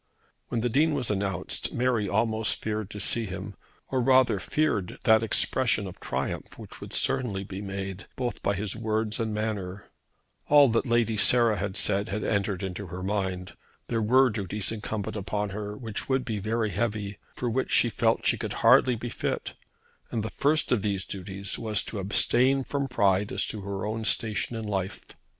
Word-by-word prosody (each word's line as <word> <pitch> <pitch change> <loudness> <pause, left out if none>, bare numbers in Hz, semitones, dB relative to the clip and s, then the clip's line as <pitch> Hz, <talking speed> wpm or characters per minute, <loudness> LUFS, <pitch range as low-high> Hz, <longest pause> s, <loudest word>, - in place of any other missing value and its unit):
When 115 - -2
the 120 - 0
Dean 150 +5 +3
was 125 -6 -1
announced 100 -2 -2
Mary 120 -5 +1
almost 110 +2 +1
feared 110 -2 -3
to 105 - -7
see 115 +3 +3
him, 95 +2 -6 0.4
or 130 -1 +1
rather 130 -4 +4
feared 125 -8 -1
that 110 0 +5
expression 115 -1 +2
of 95 - -9
triumph - - -4
which - - -10
would - - -8
certainly 125 -8 +1
be 95 0 -7
made 95 -1 -5
both 125 -2 -3
by 100 - 0
his 100 0 -2
words 110 0 -1
and 110 -1 -1
manner. 105 -3 -4 0.6
All 145 -2 +7
that 115 +2 +1
Lady 115 -2 +2
Sarah 115 0 +5
had 95 0 -2
said 100 +2 +2
had 105 +2 -3
entered 100 -2 -1
into 95 +1 -5
her 90 +2 -6
mind. 95 -2 -2 0.4
There 115 -2 0
were 130 +4 +4
duties 105 -1 -2
incumbent 105 -2 -4
on 105 -1 0
her 105 +1 -5
which 110 0 -5
would 130 -1 +1
be 110 -3 -2
very 110 +1 -1
heavy, 105 0 -2 0.2
for 125 - -3
which 125 +3 -1
she - - +4
felt - - +2
that - - -12
she - - +2
could - - -3
hardly 125 -2 +6
be 120 +2 -5
fit, - - -3 0.6
and 110 - -2
the 110 - -4
first 150 +2 +1
of 120 -5 +3
these 100 -2 -1
duties 95 +1 -3
was 110 -2 0
to 105 - -5
abstain 125 +7 +3
from 140 +1 -2
pride 100 -5 +2
as - - 0
to 105 - -4
her 100 0 -4
own 110 +1 -3
station 110 +1 +1
in 110 - -4
life. 95 -3 -2
105 Hz, 185 wpm, -27 LUFS, 100-120 Hz, 0.6 s, All